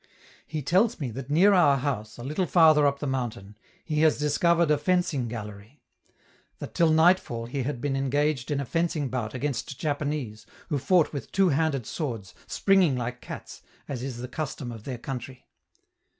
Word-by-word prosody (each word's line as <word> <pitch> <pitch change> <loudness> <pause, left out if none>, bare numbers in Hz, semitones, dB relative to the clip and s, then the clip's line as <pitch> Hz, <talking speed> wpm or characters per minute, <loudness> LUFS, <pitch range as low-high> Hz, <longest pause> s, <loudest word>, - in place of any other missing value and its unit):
He 155 0 -4
tells 190 - +2
me 135 -6 -3
that 130 +3 -7
near 185 +8 +5
our 155 -7 +5
house, 125 -6 -3
a 120 - -8
little 155 +7 -1
farther 155 -4 +6
up 140 0 0
the 145 - -5
mountain, 120 -6 -4 0.3
he 155 -2 0
has 155 -2 +4
discovered 165 +3 +2
a 150 - +3
fencing 175 -7 0
gallery: 105 +3 -8 0.8
that - - -8
till 165 -1 +3
nightfall 160 -7 +3
he 135 +4 -3
had 130 0 -3
been 140 +1 -1
engaged 135 0 0
in 145 -2 0
a 140 - -2
fencing 160 -1 -1
bout 120 -2 -3
against 135 0 -3
Japanese, 145 -7 -3 0.2
who 145 -4 0
fought 170 +3 +3
with 140 -6 -6
two 195 -1 +3
handed 145 -4 0
swords, 115 - -5
springing 190 -8 +3
like 125 +1 -4
cats, - - -9 0.3
as 130 -4 -4
is 130 -2 -5
the 125 +1 -5
custom 135 -2 -5
of 110 -2 -10
their 130 -3 -4
country. 130 +1 -7
140 Hz, 180 wpm, -26 LUFS, 125-155 Hz, 0.8 s, farther